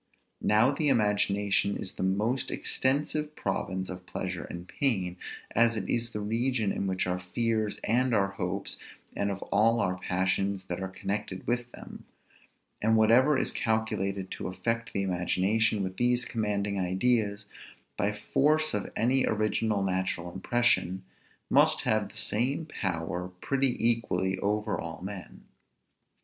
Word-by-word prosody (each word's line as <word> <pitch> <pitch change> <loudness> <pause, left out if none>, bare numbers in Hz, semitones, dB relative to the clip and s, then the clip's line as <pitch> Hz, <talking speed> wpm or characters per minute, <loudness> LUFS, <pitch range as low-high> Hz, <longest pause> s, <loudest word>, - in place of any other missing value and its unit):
Now 110 +5 +4
the 150 +1 0
imagination 105 -3 +2
is 95 - -5
the - - -7
most 105 +7 0
extensive 150 +3 0
province 95 -1 -2
of 90 0 -8
pleasure 90 -2 -4
and 85 +1 -8
pain, 95 -11 0 0.4
as 115 0 +3
it 105 - -3
is 120 0 0
the 105 - -5
region 115 0 0
of 95 -1 -1
our 90 0 -1
fears 110 +3 -1
and 125 +3 +2
our 100 -3 +2
hopes, 100 0 -3 0.4
and 100 - 0
of 100 -1 -4
all 115 +3 +4
our 90 -4 0
passions 95 +1 0
that 90 0 -4
are 95 - -2
connected 95 0 -4
with 120 +1 -1
them; - - -11 0.8
and 110 +1 +3
whatever 125 +6 +5
is - - +1
calculated 105 -4 -1
to - - -4
affect 115 +5 -2
the 100 - -1
imagination 95 +4 +1
with 95 0 -4
these 125 0 +2
commanding 105 -3 -1
ideas, 100 +3 +1 0.5
by 100 - +1
force 150 +9 +1
of 105 -2 -2
any 130 +4 +2
original 110 -1 +1
natural 95 -2 -2
impression, 95 -3 +1 0.4
must - - +4
have - - +1
the - - -10
same 130 +9 0
power 90 - -3
pretty 135 +1 +2
equally 95 -5 +1
over 105 +2 -1
all 85 -1 -6
men. 95 -1 -8
105 Hz, 140 wpm, -29 LUFS, 95-115 Hz, 0.8 s, whatever